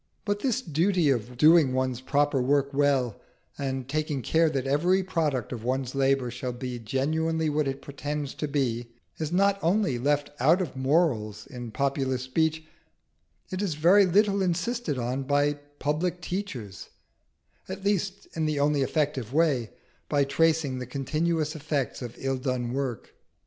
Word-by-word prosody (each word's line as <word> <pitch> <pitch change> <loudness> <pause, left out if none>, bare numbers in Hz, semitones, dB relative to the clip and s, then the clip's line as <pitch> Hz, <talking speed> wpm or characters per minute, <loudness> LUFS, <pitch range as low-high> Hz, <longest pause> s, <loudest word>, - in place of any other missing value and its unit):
But 205 0 0
this 255 +2 0
duty 170 0 +2
of 120 0 -2
doing 155 -2 +6
one's 130 -1 -1
proper 145 0 +1
work 140 +2 +1
well, 135 -5 +1 0.3
and 135 -2 -3
taking 150 -2 -2
care 165 0 +3
that 135 -3 -2
every 175 +8 +2
product 155 - -1
of 120 -3 -5
one's 130 +1 -1
labour 135 -2 +1
shall 125 +1 -4
be 125 0 -5
genuinely 155 +7 0
what 150 -1 +1
it 135 0 -4
pretends 145 0 -4
to 150 - -3
be, 120 -5 -1 0.3
is 155 -1 -2
not 200 +2 +3
only 175 - +1
left 145 +2 0
out 155 +9 +4
of 175 -8 -3
morals 130 - +1
in 120 -3 -8
popular 135 +2 0
speech, 155 +5 -1 0.9
it 185 +1 -2
is 190 -7 -1
very 185 +6 +5
little 200 +2 +3
insisted 180 - -1
on 125 +2 -2
by 145 +2 +2 0.2
public 165 +5 -1
teachers, 160 - -5 0.8
at 190 +1 -6
least 200 0 -1
in 160 -1 -1
the 150 -2 0
only 145 0 +2
effective 140 -4 -1
way 145 -8 +2 0.4
by 145 -1 +3
tracing 155 -2 +1
the 125 - -6
continuous 155 +4 -1
effects 145 -4 -2
of 120 -1 -6
ill 135 0 -1
done 125 -2 -2
work. 130 -5 -3
145 Hz, 155 wpm, -27 LUFS, 130-165 Hz, 0.9 s, doing